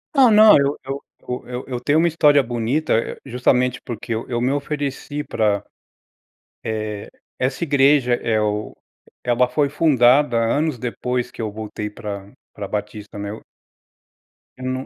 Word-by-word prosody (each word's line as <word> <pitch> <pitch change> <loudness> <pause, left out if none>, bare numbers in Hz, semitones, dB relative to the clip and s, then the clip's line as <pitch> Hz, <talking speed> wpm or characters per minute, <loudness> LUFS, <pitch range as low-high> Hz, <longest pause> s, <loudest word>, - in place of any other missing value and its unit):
Não, 260 -4 +6
não. 215 0 +8
Eu 140 +1 +1
eu 135 +1 -4 0.5
eu 125 0 -5
eu 125 -2 -3
tenho 145 +6 +2
uma 170 - +4
história 150 -3 +4
bonita, 120 +5 -1
eh, 115 - 0
justamente, 125 0 +1
porque 120 -1 -5
eu 110 +1 -4
eu 120 -1 -1
me 125 +2 +1
ofereci 145 0 -3
pra, 105 -5 0 1.0
eh, 105 -2 -4 0.3
essa 130 +6 -1
igreja. 140 -4 +4
É 115 -2 0
o 105 0 -2 0.5
ela 125 0 +2
foi 140 +3 +1
fundada 135 -4 +4
anos 140 +5 +1
depois 125 +1 -3
que - - -8
eu 110 -2 -3
voltei 105 0 -5
pra 100 -1 -7 0.2
pra 100 -1 -6
Batista, 105 0 -5
né. 100 +1 -5 1.2
Ia 130 - -10
num 130 +1 -3
125 Hz, 150 wpm, -21 LUFS, 110-140 Hz, 1.2 s, não